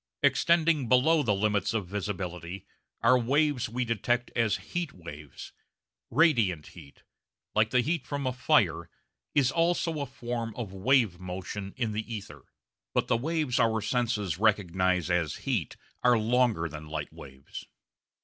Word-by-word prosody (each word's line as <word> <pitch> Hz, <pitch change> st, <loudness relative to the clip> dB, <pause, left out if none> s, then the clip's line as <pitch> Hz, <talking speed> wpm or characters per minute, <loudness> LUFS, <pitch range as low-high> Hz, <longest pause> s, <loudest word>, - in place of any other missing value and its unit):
Extending 155 Hz, 0 st, +3 dB
below 150 Hz, +6 st, +5 dB
the 110 Hz, -7 st, +1 dB
limits 105 Hz, +1 st, 0 dB
of 105 Hz, -4 st, -1 dB
visibility 90 Hz, -2 st, -5 dB, 0.4 s
are 125 Hz, +2 st, +6 dB
waves 135 Hz, 0 st, +1 dB
we 125 Hz, +2 st, -2 dB
detect 120 Hz, +2 st, 0 dB
as 115 Hz, -3 st, +2 dB, 0.2 s
heat 175 Hz, -4 st, -2 dB
waves. 75 Hz, -5 st, -10 dB, 0.6 s
Radiant 115 Hz, -, +3 dB
heat, 75 Hz, -6 st, -15 dB, 0.5 s
like 110 Hz, 0 st, +3 dB
the 125 Hz, -, +3 dB
heat 150 Hz, -1 st, -2 dB
from 140 Hz, -1 st, -3 dB
a 130 Hz, -, 0 dB
fire, 125 Hz, -, +2 dB, 0.5 s
is 140 Hz, -2 st, +4 dB
also 165 Hz, -1 st, +1 dB
a 140 Hz, -, -3 dB
form 120 Hz, -3 st, -5 dB
of 110 Hz, -6 st, -5 dB
wave 105 Hz, -2 st, +2 dB
motion 95 Hz, +2 st, -6 dB
in 115 Hz, -4 st, -1 dB
the 110 Hz, +2 st, -4 dB
ether, 105 Hz, -3 st, -7 dB, 0.5 s
but -, -, +1 dB
the -, -, +4 dB
waves 150 Hz, 0 st, 0 dB
our 115 Hz, -2 st, +3 dB
senses 110 Hz, -7 st, -1 dB
recognise 95 Hz, -4 st, +2 dB
as 85 Hz, -4 st, +1 dB
heat 115 Hz, -, -1 dB, 0.3 s
are 125 Hz, -1 st, +5 dB
longer 115 Hz, -5 st, +2 dB
than 75 Hz, -1 st, -9 dB
light 75 Hz, -1 st, -5 dB
waves. 65 Hz, +1 st, -11 dB
115 Hz, 145 wpm, -28 LUFS, 95-130 Hz, 0.6 s, are